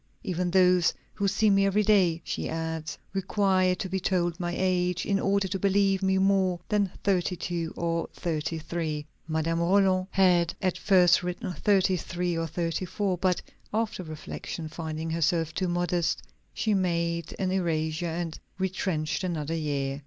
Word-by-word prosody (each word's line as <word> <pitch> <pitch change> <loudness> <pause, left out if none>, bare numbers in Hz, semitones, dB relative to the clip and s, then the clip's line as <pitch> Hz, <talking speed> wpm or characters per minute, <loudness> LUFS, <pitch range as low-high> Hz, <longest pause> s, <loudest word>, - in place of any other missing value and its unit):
"Even 180 -1 -1
those 180 -1 +4 0.2
who 200 - 0
see 215 +2 +3
me 195 0 +4
every 195 +2 +3
day," 185 -6 +3
she - - -3
adds, 160 0 -4 0.2
"require 190 -1 +2
to 190 +1 -4
be 190 +1 -2
told 175 -2 0
my 175 -1 -2
age, 180 -1 +1
in 200 -1 +1
order 200 0 +1
to 190 +1 -3
believe 195 0 +2
me 190 0 +2
more 190 -2 +2
than 205 -2 +2
thirty 185 -2 +1
two 170 -1 -3
or 170 0 -1
thirty 165 -1 -3
three." 160 -2 -3 0.2
Madame 160 +1 0
Roland 185 +1 +3
had 175 -3 +3
at 185 -2 0
first 180 -4 +4
written 180 0 -4
thirty 190 -1 +2
three 175 0 -2
or 165 0 -1
thirty 165 +2 -2
four. 195 +1 -1
But 180 0 0 0.3
after 220 -2 -1
reflection, 155 0 -6
finding 160 0 -4
herself 165 0 +1
too 185 - -1
modest, 175 -1 0 0.3
she 220 - 0
made 170 -3 0
an 185 -1 -1
erasure 165 -2 0
and 165 -1 -4 0.2
retrenched 185 -4 -1
another 165 -4 -2
year. 140 -3 -2
180 Hz, 160 wpm, -27 LUFS, 165-190 Hz, 0.3 s, those